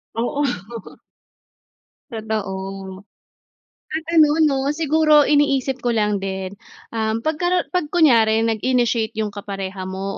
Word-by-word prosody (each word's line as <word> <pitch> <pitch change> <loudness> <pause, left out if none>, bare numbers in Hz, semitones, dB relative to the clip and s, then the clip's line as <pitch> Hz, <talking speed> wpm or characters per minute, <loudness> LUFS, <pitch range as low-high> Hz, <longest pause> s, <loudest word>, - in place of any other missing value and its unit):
Oo. 235 -4 -2 1.4
Totoo, 195 -3 -5 0.9
at 315 0 -3
ano 305 -1 +5
'no 285 -3 +3 0.2
siguro 310 -1 +4
iniisip 275 -3 +2
ko 240 - +2
lang 210 -2 +1
din, 190 -1 -4 0.4
um, 220 0 -1
'pag 315 +3 -1
karo 355 +1 +1
'pag 360 -3 -1
kunyari 230 -10 +4
nag-initiate 230 0 0
'yung 215 -1 -1
kapareha 195 -2 -6
mo 190 +1 -5
225 Hz, 110 wpm, -21 LUFS, 200-295 Hz, 1.4 s, ano